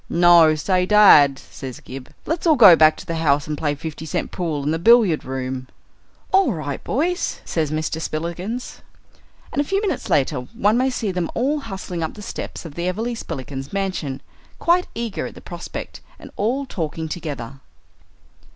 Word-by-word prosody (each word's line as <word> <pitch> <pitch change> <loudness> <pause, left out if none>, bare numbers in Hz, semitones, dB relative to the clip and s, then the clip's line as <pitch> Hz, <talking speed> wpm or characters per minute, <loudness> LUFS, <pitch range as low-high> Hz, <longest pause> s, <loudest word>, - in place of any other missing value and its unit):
"No. 170 -2 +6
Say, 180 +4 0
dad," 155 -10 +7
says 130 -2 -9
Gib, 130 0 -10
"let's 325 +2 -2
all 315 - +6
go 205 -9 +9
back 155 -1 +5
to - - -10
the 165 - -3
house 145 -3 +2
and 155 - -3
play 145 -1 -1
five 160 +2 -6
cent 155 - -3
pool 160 -6 -3
in 150 - 0
the 160 - -1
billiard 220 -5 +5
room." 130 0 -4 0.6
"All 385 - +4
right, 145 -4 -5
boys," 350 - -1
says 160 -3 -1
Mr. 155 +1 -2
Spillikins. 175 +10 -4 0.7
And 285 - 0
a - - +1
few 390 +7 0
minutes 410 -2 -3
later 140 -1 +2
one 210 - 0
may 255 +2 +2
see 230 -5 -2
them 180 -2 -2
all 280 +5 +1
hustling 190 -8 -6
up 160 - -3
the 210 - -9
steps - - -6
of 160 - -8
the 170 +3 -3
Everleigh 225 +6 -2
Spillikins's 135 - -6
mansion, 185 -9 -3 0.4
quite 355 +1 +2
eager 230 -2 -3
at - - -11
the - - -10
prospect, - - -8 0.2
and - - -12
all 255 +7 -1
talking 160 - -4
together. 140 -6 -6
170 Hz, 180 wpm, -21 LUFS, 150-225 Hz, 0.7 s, go